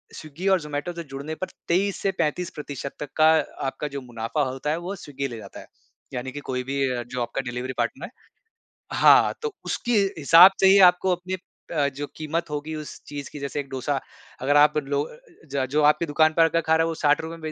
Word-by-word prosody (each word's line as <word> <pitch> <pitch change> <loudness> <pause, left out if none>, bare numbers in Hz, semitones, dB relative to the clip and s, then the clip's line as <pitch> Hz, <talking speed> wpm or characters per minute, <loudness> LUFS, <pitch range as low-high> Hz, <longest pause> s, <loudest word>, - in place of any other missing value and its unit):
Swiggy 155 +5 -6
और 185 - 0
ज़ोमैटो 150 +3 -4
से 170 0 -6
जुड़ने 140 +3 -5
पर 185 - -4 0.2
23 195 +3 +1
से 195 - +1
35% 150 -4 -3
प्रतिशत - - -3
तक 145 - -10
का 155 +1 +6
अ, - - -2 0.2
आपका 140 +2 -3
जो 140 -1 -6
मुनाफ़ा 120 +4 -3
होता 135 +3 -4
है 155 - +1
वो 180 +4 -5
स्विग्गी 140 -5 -5
ले 120 -3 -8
जाता 100 -3 -10
है। - - -11 0.5
यानी 125 +1 -4
कि 145 - -6
कोई 125 -1 -1
भी 140 +2 -3
अ, 120 -1 -2
जो 125 0 -4
आपका 120 +3 -2
डिलिवरी 125 +2 -4
पार्टनर 120 +6 -2
है - - -11 0.8
हाँ, - - +6
तो 450 -2 -3
उसके 240 - -2 0.3
हिसाब 165 +5 +8
से 195 - +5
ही 195 +1 +7
आपको 180 +1 -1
अपनी 180 +2 -6 0.4
अ, 145 -4 +2
जो 140 +1 -6
कीमत 160 +1 -3
होगी 150 +1 -4
उस 155 -1 -8
चीज़ 145 -1 -7
की - - -7
जैसे 140 +1 -3
1 140 - -8
डोसा 135 +1 -2 0.4
अगर 145 +2 +2
आप 150 +1 +5
लो 140 -1 -1
अ - - -12
अ, - - -16 0.4
ज 135 -1 +1
जो 150 +1 +2
आपकी 150 +3 +4
दुकान 155 +1 +3
पर 165 - +6
आ 165 - +4
कर 165 - +1
खा 160 -1 +2
रहा 165 - +3
है - - -1
वो 165 - -2
₹60 160 +3 +2
में 165 - -16
150 Hz, 235 wpm, -24 LUFS, 135-165 Hz, 0.8 s, हिसाब